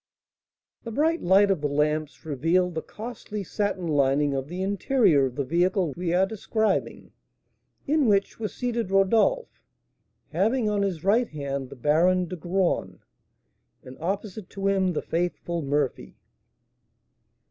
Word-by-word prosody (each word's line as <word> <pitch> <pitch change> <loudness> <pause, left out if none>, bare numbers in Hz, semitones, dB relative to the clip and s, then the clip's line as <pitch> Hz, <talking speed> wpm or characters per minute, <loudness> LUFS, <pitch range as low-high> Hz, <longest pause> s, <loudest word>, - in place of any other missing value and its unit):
The 230 - -6
bright 315 +8 +1
light 195 +2 +4
of 185 -6 0
the 150 - +1
lamps 150 +1 -1
revealed 165 +5 +1
the 160 - -3
costly 215 -1 -7
satin 200 -1 -2
lining 145 -1 +2
of 135 0 -3
the 180 +4 -4
interior 200 - +3
of 125 - -9
the 140 - -1
vehicle 175 +2 +1
we 175 -1 -2
are 180 +2 +3
describing, 220 +1 -2 0.7
in 295 -2 +2
which 200 0 +1
were 220 - -1
seated 235 -3 -3
Rodolph, 220 - +2 0.7
having 215 +8 +1
on 205 -1 +1
his 185 -6 -2
right 225 +5 +3
hand 140 -3 -4
the - - -10
Baron 170 +7 +2
de 180 - -6
Graün, 180 +2 -1 0.9
and 130 0 -11
opposite 195 +3 -4
to 195 0 -6
him 190 -2 +2
the - - -2
faithful 170 0 -2
Murphy. 145 -2 -2
185 Hz, 140 wpm, -26 LUFS, 155-205 Hz, 0.9 s, light